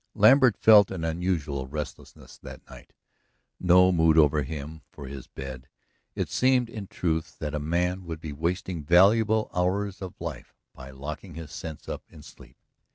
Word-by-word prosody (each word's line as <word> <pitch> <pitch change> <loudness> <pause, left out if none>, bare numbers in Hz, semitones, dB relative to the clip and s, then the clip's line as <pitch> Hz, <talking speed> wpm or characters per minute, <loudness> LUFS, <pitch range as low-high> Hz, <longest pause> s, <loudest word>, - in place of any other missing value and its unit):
Lambert 120 0 +5
felt 105 -3 +6
an 90 -4 -5
unusual 80 -5 -2
restlessness 75 0 -8
that - - -12
night - - -14 0.7
no 90 +1 +5
mood 80 -2 +3
over 75 -1 +4
him 75 +2 -7
for 70 - -11
his 65 -1 -9
bed. 65 -1 -9 0.5
It - - -2
seemed, 125 -2 +1
in 105 -4 -7
truth, 80 -3 -3
that 75 -1 -5
a 75 - -1
man 90 +4 -1
would 80 -2 -6
be 80 -2 -7
wasting 85 +2 -3
valuable 105 +7 +4
hours 95 +3 -1
of 95 -2 -8
life - - -7 0.2
by 65 0 -11
locking 75 +6 -8
his 80 -2 -9
senses 80 -2 -8
up - - -5
in 75 - -15
sleep. - - -16
85 Hz, 160 wpm, -26 LUFS, 75-95 Hz, 0.7 s, felt